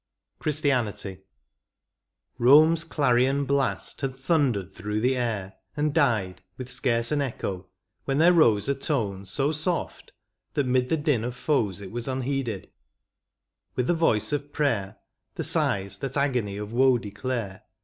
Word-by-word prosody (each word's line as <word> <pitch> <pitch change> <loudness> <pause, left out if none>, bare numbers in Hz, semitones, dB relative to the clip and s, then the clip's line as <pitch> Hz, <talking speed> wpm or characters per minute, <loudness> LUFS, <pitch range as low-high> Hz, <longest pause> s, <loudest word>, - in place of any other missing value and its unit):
11 - - -43
CHRISTIANITY. 120 -10 -1 1.2
Bome's 155 +6 +6
clarion 140 -3 +2
blast 140 0 -1
had 135 -2 -2
thundered 130 - 0
through 105 +4 -3
the 125 +4 +2
air, 110 -6 -2 0.2
And 150 0 0
died 110 - +1 0.2
with 130 -1 -7
scarce 120 -2 0
an 150 -1 +1
echo, 100 -8 -4 0.4
when 135 0 0
there 170 +4 +6
rose 115 - +4
A 140 - +2
tone 110 -9 -2
so 135 +10 0
soft, 160 +3 -2 0.4
that 145 -3 +1
'mid 125 0 +1
the 160 - +2
din 145 -7 +1
of 120 +1 -4
foes 110 - 0
It 95 - -8
was 120 0 -5
unheeded; 130 -5 -3 1.0
with 125 - 0
the 175 - +2
voice 155 -7 +1
of 145 0 -3
prayer, 115 -10 -1 0.4
The - - -3
sighs 95 0 0
that 135 0 -3
agony 125 -8 0
of 105 +2 -6
woe 130 +1 +4
declare. 105 -1 -4
125 Hz, 150 wpm, -26 LUFS, 105-145 Hz, 1.2 s, Bome's